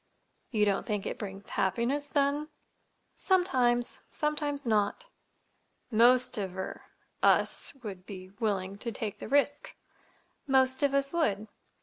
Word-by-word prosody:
"You 215 -3 +2
don't 200 +2 0
think 210 -3 -2
it - - -4
brings 200 -1 -7
happiness, 235 +10 0
then?" 285 +1 +1 0.7
"Sometimes. 255 -11 +2
Sometimes 295 -2 -1
not." 215 - +1 0.9
"Most 240 +1 +4
of—er—us 190 +7 -1
would 190 -4 -7
be 185 -2 -9
willing 200 -3 -1
to 235 - -3
take 210 -1 -5
the - - -6
risk." 285 +1 +1 0.7
"Most 260 0 +3
of 280 -1 +2
us 275 +1 0
would." 215 -11 0
240 Hz, 115 wpm, -30 LUFS, 205-285 Hz, 0.9 s, Most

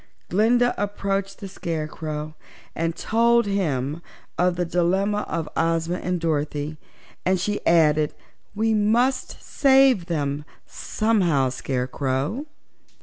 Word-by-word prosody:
Glinda 240 +6 +3
approached 195 -1 -2
the 200 - -7
Scarecrow 155 -3 -4 0.4
and 165 0 -1
told 235 +1 +3
him 155 -7 -1 0.3
of 180 0 +2
the 175 0 -1
dilemma 190 +5 +1
of 165 -2 -2
Ozma 165 +1 0
and 180 -1 -2
Dorothy 150 -1 -2 0.5
and 185 0 +2
she 205 +3 -2
added: 155 -3 +3 0.4
"We 220 +1 +1
must 240 +5 +1
save 265 - +4
them, 145 -4 -2 0.2
somehow, 180 - +1
Scarecrow." 135 - -2
175 Hz, 105 wpm, -23 LUFS, 155-210 Hz, 0.5 s, save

